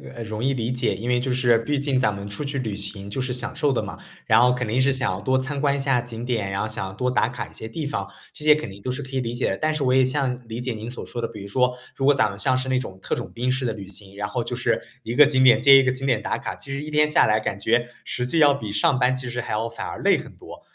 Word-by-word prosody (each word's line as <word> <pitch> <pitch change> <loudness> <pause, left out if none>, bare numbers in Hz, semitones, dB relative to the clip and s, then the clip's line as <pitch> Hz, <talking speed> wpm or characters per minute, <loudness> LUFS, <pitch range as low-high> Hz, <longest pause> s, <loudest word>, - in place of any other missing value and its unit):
呃， 115 - -5
容 110 +1 -5
易 135 - +2
理 120 -1 -2
解。 125 -4 0
因 115 +6 -4
为 125 0 +3
就 125 0 -1
是 120 -2 +4
毕 140 +5 -1
竟 140 -2 +1
咱 105 -4 +2
们 100 0 -7
出 100 +9 -5
去 140 -1 -3
旅 110 -5 -3
行 100 0 -6
就 120 - -4
是 130 -1 -1
享 120 -2 -5
受 145 -2 +1
的 - - 0
嘛， - - -7 0.3
然 - - +6
后 125 +1 +5
肯 125 -2 -2
定 120 +4 0
是 135 +1 +3
想 105 -7 -2
多 130 +2 +2
参 140 +2 -2
观 140 -1 +2
一 140 - -2
下 135 -3 +2
景 120 -1 -6
点， 110 -6 -1
然 95 - -1
后 110 - -1
想 95 -2 -5
多 125 +2 0
打 125 - +2
卡 125 -1 -5
一 - - -18
些 110 - -7
地 145 +5 -4
方， 100 -8 -2 0.2
这 150 - -10
些 150 - +8
肯 150 -8 -3
定 95 +1 -11
都 125 - -2
是 130 - -4
可 130 - -9
以 - - +2
理 115 0 -3
解 120 - 0
的。 95 - -2
但 155 0 0
是 150 -2 -2
我 130 - +2
也 130 -1 +5
像 130 -2 -1
理 115 +2 -5
解 125 0 -2
您 110 +1 -7
所 125 - -4
说 120 - -6
的， 115 - -1
比 110 -3 -10
如 100 - -7
说 125 +4 +1 0.2
如 135 - -1
果 145 - +6
咱 130 - +2
们 100 - -8
像 130 +3 +1
是 130 +1 -2
那 130 - +2
种 95 -7 -5
特 - - -1
种 - - -6
兵 125 +2 -1
式 130 0 -1
的 115 - 0
旅 100 -3 -9
行， 100 0 -11
然 105 0 -3
后 120 -2 -2
就 125 - -4
是 120 -1 +1 0.2
一 115 -1 -5
个 150 +2 +8
景 130 -2 +3
点 125 - +7
接 140 -1 +8
一 - - +3
个 130 - +2
景 135 +1 -5
点 120 -5 +2
打 - - -1
卡， - - -5
其 135 - -10
实 140 +2 -3
1 155 - -7
天 150 0 +3
下 - - +5
来 110 0 +3
感 100 -2 -3
觉 120 +3 +1 0.2
实 125 - -3
际 165 - -1
要 145 -2 +6
比 110 -7 -5
上 135 +5 +2
班 125 +1 +3
其 125 -1 -5
实 120 0 -2
还 - - -6
要 110 +2 0
反 115 - -6
而 - - -6
累 - - +5
很 - - -11
多。 - - -12
125 Hz, 355 characters per minute, -23 LUFS, 110-135 Hz, 0.3 s, 些